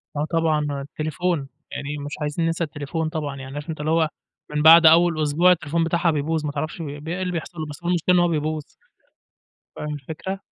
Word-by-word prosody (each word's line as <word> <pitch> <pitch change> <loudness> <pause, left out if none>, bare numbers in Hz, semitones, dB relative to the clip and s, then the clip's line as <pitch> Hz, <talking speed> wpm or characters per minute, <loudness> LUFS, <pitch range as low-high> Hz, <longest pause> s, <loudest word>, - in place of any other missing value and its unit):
آه 145 - 0
طبعًا، 150 -4 0
التليفون 155 +1 -2 0.2
يعني 145 +1 -4
مش 145 - -6
عايزيِن 150 +3 -1
ننسى 165 +1 0
التليفون 150 +2 -3
طبعًا، 150 -4 -4
يعني 135 0 -8
عارف 145 +2 -6
أنت 155 - -4
اللي 155 +2 -1
هو 160 -1 +3 0.4
من 150 - 0
بعد 165 +1 +9
أوِّل 165 0 +6
أسبوع 165 +5 +4
التليفون 165 -1 +1
بتاعها 170 0 +2
بيبوظ، 155 +1 -1
ما 145 - -1
تعرفش 155 +3 -4
ب - - -3 0.2
ب - - -10
إيه 180 +3 -3
اللي 180 -1 -1
بيحصل 165 0 -5
له، 155 - -2
بس 150 +3 -10
هو 175 - -1
المشكلة 180 +1 +2
إن - - +5
هو 175 - +4
بيبوظ. 155 -1 -1 1.1
فاهم 150 0 -4
الفكرة؟ 160 +7 -6
155 Hz, 210 wpm, -23 LUFS, 150-170 Hz, 1.1 s, بعد